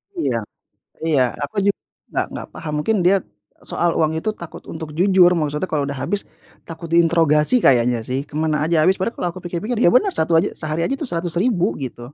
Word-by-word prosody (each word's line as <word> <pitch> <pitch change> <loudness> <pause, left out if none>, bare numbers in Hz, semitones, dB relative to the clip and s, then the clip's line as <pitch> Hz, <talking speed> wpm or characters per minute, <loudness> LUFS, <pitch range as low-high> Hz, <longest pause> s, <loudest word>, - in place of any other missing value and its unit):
Iya. 330 - -1 0.7
Iya, 155 -5 +2 0.2
aku 145 - -4
jug 200 - +2 0.3
nggak - - -1
nggak - - -6
paham, 155 -3 -6
mungkin 220 +7 +1
dia 190 +3 +5 0.5
soal 175 - +1
uang 155 -1 +2
itu 215 - -1
takut 170 - -9
untuk 160 -1 -6
jujur, 185 -1 +5
maksudnya 150 +3 -2
kalau 145 -2 +1
udah 140 -2 -5
habis 205 0 -1 0.5
takut 165 +1 -8
diintrogasi 165 - +3
kayaknya 120 -2 +4
sih 130 +2 -1
ke - - -17
mana 155 -1 +1
aja 165 +2 +1
habis 185 +4 +4
padahal 230 +5 -1
kalau 180 - -1
aku 185 - -9
pikir-pikir 185 +8 -3
ya - - +7
benar, 385 +9 +4
satu 160 +1 0
aja 180 - +2
sehari 155 +1 -3
aja 270 - 0
itu 300 - -3
Rp100.000 175 +4 0
gitu, 125 -2 -6
170 Hz, 200 wpm, -20 LUFS, 150-185 Hz, 0.7 s, ya